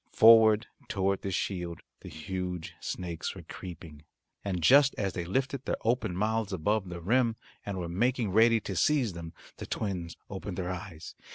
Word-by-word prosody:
Forward 110 -1 +7 0.2
toward 95 0 0
this 95 -2 -2
shield 90 -4 -3 0.2
the - - -10
huge 90 +1 -5
snakes 85 -3 -4
were - - -9
creeping, 80 -4 -10 0.4
and 90 -4 -2
just 140 - +6
as 100 -2 -1
they 85 -3 -3
lifted 135 +7 -1
their - - -1
open 115 -6 +1
mouths 110 +2 0
above 95 +2 0
the 90 -1 -6
rim, 115 +5 +2 0.3
and 100 -2 -3
were 90 -2 -3
making 115 +4 0
ready 115 +3 +5
to 95 - -5
seize 130 - +2
them, 85 -1 -7 0.3
the - - -7
twins 90 -6 -3
opened 95 -2 -6
their 90 -1 -2
eyes. 85 -3 -7
95 Hz, 170 wpm, -29 LUFS, 90-110 Hz, 0.4 s, Forward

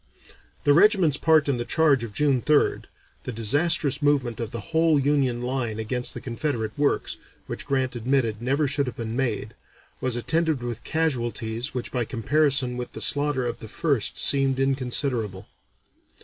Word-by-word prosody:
The 145 - +4
regiment's 175 - +4
part 155 -1 +3
in 140 -3 +1
the 120 - -2
charge 145 -2 +2
of 115 - -6
June 135 +3 +1
3rd, 150 +2 +2 0.4
the - - -3
disastrous 140 +6 +2
movement 140 -5 +1
of 115 -2 -3
the 115 - -5
whole 160 -2 +3
Union 135 -4 +1
line 125 -4 -2
against 125 +3 -2
the - - -5
Confederate 115 -3 -3
works, 145 0 0 0.3
which - - -6
Grant 130 -2 -1
admitted 120 -2 0
never 140 +4 +1
should 140 0 0
have 125 - -5
been 115 -1 -5
made, 115 -4 -2 0.5
was 130 -2 0
attended 160 +2 0
with 120 -2 -5
casualties 120 -4 -2
which 125 - -4
by 125 -2 0
comparison 130 +2 +1
with 125 - -6
the - - -7
slaughter 145 -3 +1
of 120 - -4
the 110 - -8
1st 140 0 -1
seemed 135 -1 +3
inconsiderable. 125 -6 -1
130 Hz, 165 wpm, -24 LUFS, 120-145 Hz, 0.5 s, The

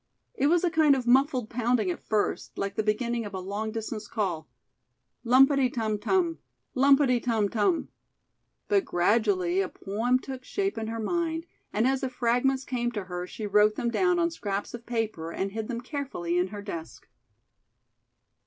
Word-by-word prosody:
It 360 -11 +1
was 345 +3 +3
a 350 - +2
kind 310 -3 +5
of 255 -2 -3
muffled 255 -1 +3
pounding 235 -4 +1
at - - -6
first, 215 -2 -1
like 200 -1 -2
the - - +1
beginning 230 +3 0
of 205 -2 -7
a - - -3
long 200 +4 -3
distance 220 -1 -5
call, 185 - -2 0.7
"lumpty 265 +2 +5
tum 220 -3 -1
tum; 340 - +1 0.3
lumpty 270 -2 +4
tum 225 -4 +1
tum." 225 - +1 0.8
But 400 -2 +3
gradually 185 -1 +2
a 190 - -2
poem 225 +6 0
took 260 0 -8
shape 395 +7 -2
in 220 - -4
her 225 0 -4
mind, 325 +6 -1 0.3
and 215 +3 +1
as 265 0 +1
the 265 - -1
fragments 250 +2 +1
came 240 -1 -1
to 205 -3 -3
her 180 -1 -5
she 215 - -6
wrote 210 +1 +4
them 235 - -1
down 360 +5 +2
on 340 0 +1
scraps 205 -10 -4
of 235 0 -9
paper 220 -9 -2
and 195 +3 -3
hid 220 +1 -4
them 235 -2 -4
carefully 250 - -3
in 180 - +1
her 205 +1 -8
desk. 170 -5 -7
235 Hz, 175 wpm, -27 LUFS, 205-270 Hz, 0.8 s, kind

